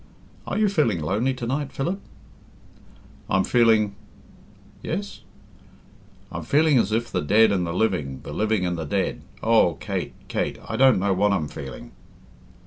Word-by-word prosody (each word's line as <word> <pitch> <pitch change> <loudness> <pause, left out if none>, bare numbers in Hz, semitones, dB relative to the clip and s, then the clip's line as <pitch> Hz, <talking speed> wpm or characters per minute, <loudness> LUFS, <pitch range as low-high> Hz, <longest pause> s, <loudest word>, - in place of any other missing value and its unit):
"Are - - -2
you 215 -1 +3
feeling 155 - +1
lonely 105 - 0
to 125 - -5
night, 140 +3 -2
Philip?" 175 +8 -2 1.3
"I'm 95 - +3
feeling 110 -4 +3 0.5
" - - -26
"Yes?" 200 +5 -5 1.1
"I'm - - -5
feeling 150 -2 +3
as 105 - 0
if 115 +2 -1
the 90 - 0
dead 105 +8 +4
and 90 -3 0
the - - -2
living, 85 -9 -1
the - - -7
living 110 -3 0
and 90 -1 -2
the 80 - -3
dead 70 - -1 0.2
oh, 110 -7 +4
Kate, - - -4
Kate, - - -2
I - - -3
don't 130 0 +5
know 95 +1 +1
what 100 +2 +2
I'm 80 -6 -1
feeling." 65 -3 -9
110 Hz, 160 wpm, -24 LUFS, 90-130 Hz, 1.3 s, don't